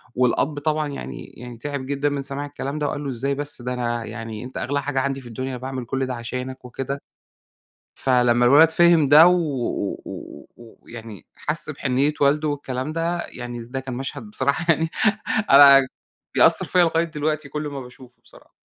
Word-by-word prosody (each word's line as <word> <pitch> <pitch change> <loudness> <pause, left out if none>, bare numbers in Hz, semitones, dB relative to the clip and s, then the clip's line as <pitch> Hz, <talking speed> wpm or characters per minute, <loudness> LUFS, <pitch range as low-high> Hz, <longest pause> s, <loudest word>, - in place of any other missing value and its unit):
والأب 135 +4 +1
طبعًا 155 0 0
يعني 65 - -7
يعني 120 -1 -9
تِعِب 140 +1 -5
جدًا 140 +1 -1
من 140 -1 -3
سماع 140 +1 -4
الكلام 145 +1 -5
ده، 145 - 0
وقال 145 +1 -4
له: 140 - -3
"إزاي 135 +3 -2
بس! 145 -3 -4
ده 125 +1 -3
أنا 120 -2 -2
يعني 115 -1 -7
أنتَ 130 - -8
أغلى 140 +1 -1
حاجة 140 -1 -1
عندي 135 0 -2
في 125 - -12
الدنيا، 130 +3 -5
أنا 125 - -5
باعمل 130 -1 -5
كل 135 +2 -2
ده 130 - -4
عشانك." 125 +2 -6
وكده، 135 +3 -5 0.9
فلمّا 125 -2 +2
الولد 155 +5 +7
فهم 170 -3 +4
ده 155 +3 +9
و 180 - +6
و 135 - -2
و - - -9
و 115 -1 -15
ويعني 110 -4 -11
حَسْ 155 0 -2
بحنية 140 +1 0
والده 150 +2 +3
والكلام 140 0 -3
ده، 170 +1 -2
يعني 120 -1 -7
ده 130 +3 -5
كان 130 -1 -6
مشهد 130 +2 -5
بصراحة 140 -1 -1
يعني، 160 +1 -1 0.6
أنا 140 -1 +8 0.5
بيأثر - - +5
فيَّ 185 - 0
لغاية 165 0 +2
دلوقتي 155 -2 -3
كل 150 +2 -4
ما 140 -1 -6
باشوفه 125 0 -14
بصراحة. - - -19
135 Hz, 185 wpm, -22 LUFS, 125-145 Hz, 0.9 s, ده